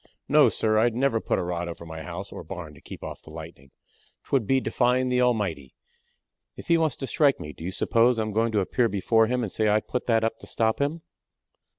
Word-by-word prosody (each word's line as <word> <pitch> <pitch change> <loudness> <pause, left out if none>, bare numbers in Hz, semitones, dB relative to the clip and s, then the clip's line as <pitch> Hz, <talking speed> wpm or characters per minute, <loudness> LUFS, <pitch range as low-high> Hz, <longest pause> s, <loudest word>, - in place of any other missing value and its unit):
"No, - - +6
sir; 110 -1 +1
I'd 115 0 +2
never 125 -3 +1
put - - 0
a 95 - -1
rod 85 0 -3
up 85 - -4
over 85 - -12
my 80 -1 -7
house 90 +5 -7
or - - -8
barn 85 -5 -8
to 70 - -17
keep - - -10
off - - -7
the - - -15
lightnin'. 80 -4 -10 0.5
'Twould 130 -7 0
be 135 0 +3
defyin' 125 0 +1
the 125 0 +2
Almighty. 100 - 0 0.8
If - - -11
he 170 - +5
wants 155 -5 +1
to 135 - -5
strike 140 0 +2
me, 75 - -7
do - - -11
you 90 - -2
suppose 115 +5 +2
I'm 110 -1 -1
goin' 115 +2 +1
to 105 - +3
appear 115 +5 +1
before 110 +3 +2
Him 125 +1 0
and 105 - -3
say 110 -1 +1
I 105 +1 +4
put 125 +3 -4
that 115 -2 +3
up 115 0 -1
to - - -11
stop 110 -1 0
him?" 155 +4 -1
110 Hz, 240 wpm, -26 LUFS, 90-125 Hz, 0.8 s, No